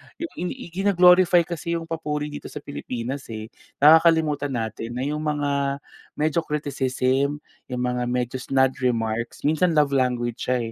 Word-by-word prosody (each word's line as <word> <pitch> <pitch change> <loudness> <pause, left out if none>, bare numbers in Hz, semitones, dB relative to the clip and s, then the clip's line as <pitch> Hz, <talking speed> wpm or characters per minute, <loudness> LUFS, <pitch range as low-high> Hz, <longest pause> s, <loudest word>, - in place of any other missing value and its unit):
Yung 335 - -6
inii 175 - -7
gino-glorify 180 -1 +5
kasi 170 0 -4
yung 165 - -3
papuri 150 -2 -3
dito 145 - -7
sa 145 - -8
Pilipinas, 130 -1 -5
eh. 110 0 -7 0.3
Nakakalimutan 155 -3 +5
natin 115 +1 -4
na 125 - -2
yung 150 +2 -2
mga 140 -2 -1 0.3
medyo 155 +2 +1
criticism, 140 -1 -1 0.2
yung 125 -1 -4
mga 125 0 -1
medyo 125 +1 -2
snide 130 0 +2
remarks. 115 -2 -1
Minsan 160 +3 +2
love 150 -2 +3
language 125 -3 -1
siya, 125 -3 0
140 Hz, 145 wpm, -24 LUFS, 125-155 Hz, 0.3 s, gino-glorify